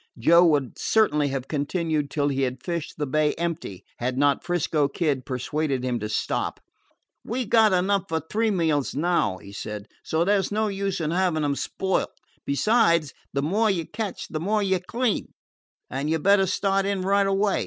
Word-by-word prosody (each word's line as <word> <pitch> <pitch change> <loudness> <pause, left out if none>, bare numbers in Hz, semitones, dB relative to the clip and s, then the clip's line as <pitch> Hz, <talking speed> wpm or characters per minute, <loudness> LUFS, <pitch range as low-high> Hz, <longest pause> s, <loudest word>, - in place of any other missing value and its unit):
Joe 170 +9 +6
would 145 -5 0
certainly 150 -10 +2
have 135 -1 -3
continued 155 0 -1
till 145 -1 0
he 135 -1 -1
had 130 -1 -2
fished 170 -3 -4
the 150 - -1
bay 150 +2 +1
empty, 160 - -4
had 125 +1 -2
not 145 0 +2
'Frisco 160 -4 +1
Kid 140 -3 -1
persuaded 135 +1 -2
him 125 -2 -1
to 105 0 -4
stop. - - -2 0.6
"We 250 +2 -2
've - - -13
got 220 -2 +6
enough 190 +1 +1
for 160 0 0
three 220 +9 -1
meals 160 -9 0
now," 155 - +1
he 100 - -12
said, 105 0 -6 0.2
"so 160 +2 0
there 200 0 +3
's - - -5
no 215 +1 +1
use 195 -1 -2
in 155 -1 -1
having 175 -3 +1
them 145 -1 0
spoil. 190 +6 -1 0.4
Besides, 170 - +3 0.2
the 140 +1 -1
more 210 +8 +2
you 175 -5 0
catch 215 +1 -5
the 155 - -4
more 205 +5 0
you 190 -2 +1
clean, 230 +5 -2 0.5
and 140 +3 -3
you 160 - +2
'd 155 - -10
better 200 -1 +5
start 195 +1 +1
in 200 -2 -1
right 200 +1 +3
away. 195 +1 +1
165 Hz, 190 wpm, -25 LUFS, 140-195 Hz, 0.6 s, Joe